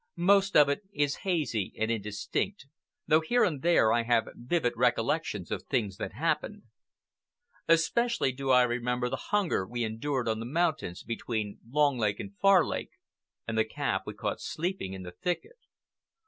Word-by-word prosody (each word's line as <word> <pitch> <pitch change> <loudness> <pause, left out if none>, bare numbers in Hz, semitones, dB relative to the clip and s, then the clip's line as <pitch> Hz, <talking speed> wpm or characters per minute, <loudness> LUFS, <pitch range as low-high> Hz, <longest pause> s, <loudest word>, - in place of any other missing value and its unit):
Most 195 +3 +4
of 150 -1 +7
it 140 +7 -1
is 145 -6 0
hazy 150 - 0
and 110 +1 0
indistinct, 110 - -3 0.4
though 155 +1 +4
here 240 +10 +2
and 150 -6 0
there 165 -10 +4
I 120 - +3
have 115 -1 +1
vivid 125 0 -1
recollections - - 0
of - - -2
things 105 -6 -1
that - - -5
happened. 165 +6 -2 1.0
Especially 165 - +2
do 135 +1 -5
I 125 -1 +6
remember 125 0 -1
the - - -5
hunger 205 - +1
we 120 +1 -3
endured 120 +4 -2
on 110 -1 0
the 115 - -5
mountains 155 - -1
between 110 -3 -4
Long 145 -1 +2
Lake 105 -2 0
and 200 0 -7
Far 195 -2 +6
Lake, - - -4 0.5
and 115 - -2
the 110 - +4
calf 110 - -2
we - - -5
caught - - -3
sleeping 170 - -3
in 95 -1 -7
the 90 - -8
thicket. 185 - -4
135 Hz, 165 wpm, -29 LUFS, 115-175 Hz, 1.0 s, of